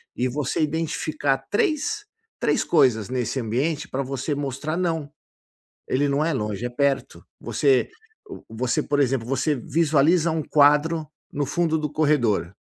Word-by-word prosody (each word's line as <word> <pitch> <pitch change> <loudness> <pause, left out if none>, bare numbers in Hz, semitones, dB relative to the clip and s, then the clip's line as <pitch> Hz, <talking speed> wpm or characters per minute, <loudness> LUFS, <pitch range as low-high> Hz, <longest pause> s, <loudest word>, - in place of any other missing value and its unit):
e 125 - 0
você 140 +3 -2
identificar 155 -2 -1
três 325 - 0 0.3
três - - +1
coisas 125 - +3
nesse 130 +1 -2
ambiente 140 +7 -1
pra 135 - -2
você 135 +2 -3
mostrar: 145 +3 -3
não, 165 -5 -2 0.8
ele 140 +3 +1
não 140 +2 +1
é 165 0 0
longe, 105 -2 -3
é - - -2
perto. 135 - -1 0.2
Você 135 -3 +2 0.6
você 120 +2 -1
por 145 0 0
exemplo, 130 -4 +1
você 135 +4 0
visualiza 160 +4 +2
um 160 -1 -1
quadro 150 +2 +3 0.3
no 145 0 -1
fundo 160 0 0
do 150 -1 -3
corredor 125 - +1
145 Hz, 140 wpm, -24 LUFS, 130-155 Hz, 0.8 s, coisas